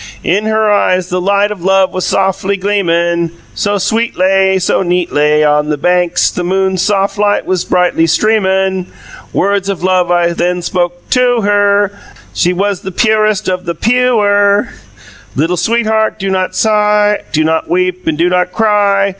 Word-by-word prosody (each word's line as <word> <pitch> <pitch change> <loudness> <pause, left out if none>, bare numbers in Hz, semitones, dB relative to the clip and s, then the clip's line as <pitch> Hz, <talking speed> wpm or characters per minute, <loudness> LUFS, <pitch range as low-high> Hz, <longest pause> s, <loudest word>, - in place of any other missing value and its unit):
"In 205 +5 0
her 220 0 +1
eyes 185 -3 +1
the 180 0 -2
light 200 +2 +1
of 195 -5 -7
love 190 0 +2
was 185 - -2
soffly 195 +1 0
gleamun', 170 -4 0 0.2
So 205 0 -1
sweetlay, 195 -2 +1
So 180 - 0
neatlay. 155 -4 +1
On 150 0 +1
the 150 - -1
banks 180 +3 +1
the 180 - -4
moon's 190 0 0
soff 200 0 0
light 205 0 +1
was 185 -2 -1
brightly 180 -2 +1
streamun', 190 -1 0 0.4
Words 200 0 0
of 190 -3 -4
love 185 -1 +1
I 175 -1 +1
then 180 +1 -2
spoke 175 0 -3
TO 245 -2 +2
her. 205 0 +2 0.4
She 175 - +1
was 195 +1 -1 0.2
purest 215 -2 +1
of 185 -1 -2
the 170 0 -3
PEW 250 +5 +1
er: 205 0 +2 0.7
'Littil 165 +5 0
sweetheart, 220 -1 0
do 195 -2 -3
not 185 -1 -2
sigh, 210 -1 +2
Do 155 0 +1
not 160 +1 -1
weep 185 +1 -1
and 160 -2 0
do 170 +2 +2
not 180 0 0
cry. 205 -2 +1
190 Hz, 160 wpm, -12 LUFS, 180-205 Hz, 0.7 s, love